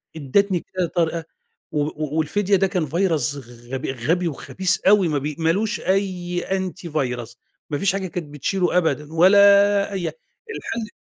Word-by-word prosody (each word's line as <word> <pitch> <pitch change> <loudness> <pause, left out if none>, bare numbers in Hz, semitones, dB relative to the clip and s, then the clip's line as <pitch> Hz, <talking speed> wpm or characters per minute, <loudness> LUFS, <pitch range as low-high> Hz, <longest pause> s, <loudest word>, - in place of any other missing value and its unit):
ادتني 175 +6 +1
كذا 180 0 -3
طريقة 165 -1 -1 0.5
و 150 0 -2
والفدية 195 +6 +1
ده 195 +1 +3
كان 180 -4 -1
virus 160 -5 0 0.3
غب 130 +1 -4
غبي 155 +8 0
وخبيث 180 +5 -1
أوي، 200 -3 +5
ما 150 -3 0
بي 145 +1 -3
ما 160 0 +1
لوش 210 +4 -1
أي 185 -2 -1
Antivirus 155 -11 -3 0.3
ما 145 - -1
فيش 195 +4 +1
حاجة 195 -1 -2
كانت 165 -4 -6
بتشيله 180 +4 0
أبدًا، 160 -3 0
ولا 200 +3 +5
أي 185 -3 -2
حا - - -23 0.4
الحل 225 -1 -5
175 Hz, 150 wpm, -22 LUFS, 150-195 Hz, 0.5 s, أوي